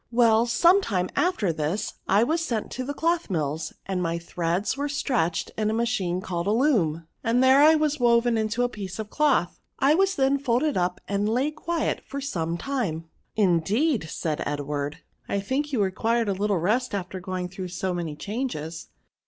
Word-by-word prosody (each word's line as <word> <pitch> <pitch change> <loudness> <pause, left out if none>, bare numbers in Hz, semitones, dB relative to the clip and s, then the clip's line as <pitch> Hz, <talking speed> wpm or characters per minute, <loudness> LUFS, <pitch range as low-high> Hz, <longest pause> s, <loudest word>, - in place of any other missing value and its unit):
Well, 230 -1 +4
some 345 - +5
time 185 - -1
after 225 - +1
this 160 +6 -2
I 200 +3 +4
was 320 +6 0
sent 230 -8 -3
to 255 - -4
the 285 +3 -4
cloth 335 -1 0
mills, 155 -3 -2
and 190 -2 -2
my 170 -1 -1
threads 170 +4 -1
were 285 +1 -2
stretched 240 - -1
in 215 -1 0
a 220 - 0
machine 205 -7 0
called 175 -1 -3
a - - +3
loom, 210 - +2 0.2
and 235 +3 +2
there 265 +2 +6
I 310 +2 +7
was 305 -2 0
woven 235 -1 +3
into 220 +2 0
a - - +3
piece 195 -6 -7
of 215 -1 -6
cloth. 285 - +1 0.2
I 275 +2 +4
was 385 +3 +2
then 275 +1 +2
folded 280 +3 +1
up, 180 0 0
and 200 +1 0
lay 255 +6 +1
quiet 320 +1 -2
for 280 - -6
some 170 - -2
time." 170 - -3
" - - -48
Indeed," 200 - +1
said 155 -1 -3
Edward, 145 0 -3 0.2
" - - -35
I 200 - 0
think 270 +9 -2
you 235 -7 +2
required 225 +4 0
a - - +2
little 200 +1 0
rest 215 +7 0
after 190 -1 -4
going 185 0 -4
through 185 0 -6
so 185 +1 -3
many 170 -4 -3
changes." 170 - -4
215 Hz, 195 wpm, -25 LUFS, 175-265 Hz, 0.2 s, I